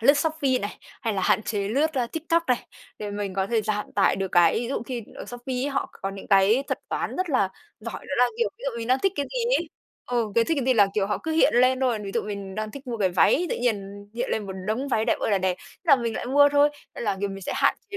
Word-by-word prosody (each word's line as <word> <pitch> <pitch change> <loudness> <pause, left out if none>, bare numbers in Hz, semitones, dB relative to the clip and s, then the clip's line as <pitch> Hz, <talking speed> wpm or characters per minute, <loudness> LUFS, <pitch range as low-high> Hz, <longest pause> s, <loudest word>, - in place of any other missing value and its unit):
lướt 280 +6 +6
Shopee 285 -4 +1
này, 205 -2 -5 0.2
hay 225 -3 -1
là 190 - -1
hạn 215 - +3
chế 200 -2 -2
lướt, 295 +8 +1
a, 250 -3 +1
TikTok 330 +5 0
này 250 -2 0 0.3
để 210 -1 -4
mình 205 -2 -4
có 190 0 0
thể 225 0 +1
giảm 210 -1 -2
tải 200 - +3
được 190 -1 -3
cái 175 -2 +5
ví 235 - -3
dụ 275 - -2
khi 245 -3 -4
ở - - -7
Shopee 245 +2 -6
ấy 260 +3 -1
họ 275 - -1
c - - -27
có 195 - -1
những 195 0 -9
cái 200 +6 +5
thuật - - -1
toán - - -3
rất 370 -1 -1
là 230 -8 +3 0.3
giỏi 230 +2 -7
đó - - -2
là, 250 - +7
kiểu, 470 - +2
ví - - -17
dụ 235 - -2
mình 230 - -5
đang 255 +1 +4
thích 390 - +3
cái 285 - -1
gì - - -3 0.2
ấy 340 - -5 0.4
ừ, 235 -4 0
cái 230 - +4
thích 325 +3 0
cái - - -2
gì 260 - +4
là, 205 -3 +6
kiểu, 200 -2 +1
họ 210 - -1
cứ 320 - -3
hiện 320 - +4
lên 255 +1 +4
thôi, 250 -4 +1
ví 195 - -4
dụ - - +1
mình 200 -2 -6
đang 215 +1 -3
thích 280 +3 -10
mua 240 -2 -3
cái 195 -3 +2
váy 310 - +3
tự - - 0
nhiên 205 -4 -2
hiện 240 - -2
lên 210 -2 -1
một 190 - -5
đống 240 +6 -1
váy 220 -4 +1
đẹp - - +1
ơi - - -1
là 200 - +3
đẹp. 185 -1 0
Thế - - -18
là 285 -5 +6
mình 235 -2 -2
lại - - -4
mua 285 +3 +6
thôi, 290 0 +5 0.3
nên - - -5
là, 205 -3 0
kiểu, 200 - 0
mình 195 0 -7
sẽ - - -3
hạn - - +3 0.2
chế 405 - -4
230 Hz, 300 wpm, -25 LUFS, 205-275 Hz, 0.4 s, là